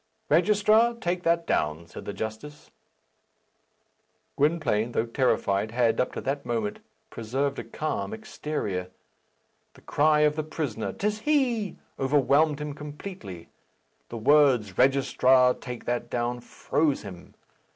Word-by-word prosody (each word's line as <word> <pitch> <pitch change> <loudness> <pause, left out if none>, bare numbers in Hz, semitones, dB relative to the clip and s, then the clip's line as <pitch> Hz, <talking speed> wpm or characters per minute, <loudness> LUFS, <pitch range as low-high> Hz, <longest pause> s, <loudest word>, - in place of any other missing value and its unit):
"Registrar, 210 +7 +4
take 180 -5 -2
that 170 -1 +1
down," 75 - -1
said 85 - -10
the - - -4
justice. 110 +9 -7 1.6
Gwynplaine, 140 -7 +1
though 115 - +1
terrified, 110 -4 0
had, 115 0 +1
up - - -2
to - - -5
that 140 +1 -2
moment, 115 -3 -2 0.3
preserved 135 +5 -2
a - - -4
calm 155 +7 -3
exterior. 150 - -4 0.9
The - - -17
cry 150 +1 +2
of 150 0 +3
the 155 - -2
prisoner, 145 -8 -4
"'Tis 210 +1 -2
he!" 240 - 0 0.2
overwhelmed 145 +2 +3
him 150 -1 -4
completely. 150 - -9 0.6
The 115 - -6
words, 125 -6 +4
"Registrar, 130 -1 +4
take 125 -1 -8
that 120 0 -2
down!" 120 0 -2
froze 150 +3 -1
him. 95 -4 -11
140 Hz, 125 wpm, -26 LUFS, 115-160 Hz, 1.6 s, Registrar